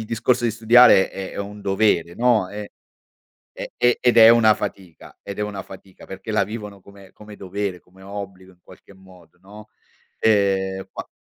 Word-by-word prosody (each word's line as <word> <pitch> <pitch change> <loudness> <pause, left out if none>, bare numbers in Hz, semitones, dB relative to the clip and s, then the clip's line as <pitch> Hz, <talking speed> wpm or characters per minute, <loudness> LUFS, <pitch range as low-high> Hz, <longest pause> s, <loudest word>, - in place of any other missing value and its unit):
il 110 - -6
discorso 115 +2 -1
di 115 - +1
studiare 115 -2 +5
è 95 -1 -8
è - - -9
un 100 +1 -7
dovere 95 -4 0
no, 115 -6 +1
ehm, 105 0 -7 0.9
e - - -7
e 120 0 +2
ed 125 -1 +2
è 115 0 +9
una 115 -2 +5
fatica 95 -4 -9
ed 100 +1 -9
è - - -1
una 100 -2 -5
fatica 95 0 -15
perché - - -8
la - - +2
vivono 105 -2 -9
come 100 0 -17
come 105 -1 -14
dovere, 95 -1 -5
come 95 +1 -22
obbligo 95 -2 -9
in 90 - -27
qualche 100 - -18
modo, 90 -3 -20
no, 105 +3 -15 0.5
ehm, 95 -3 0
ma - - -7
100 Hz, 180 wpm, -21 LUFS, 95-110 Hz, 0.9 s, è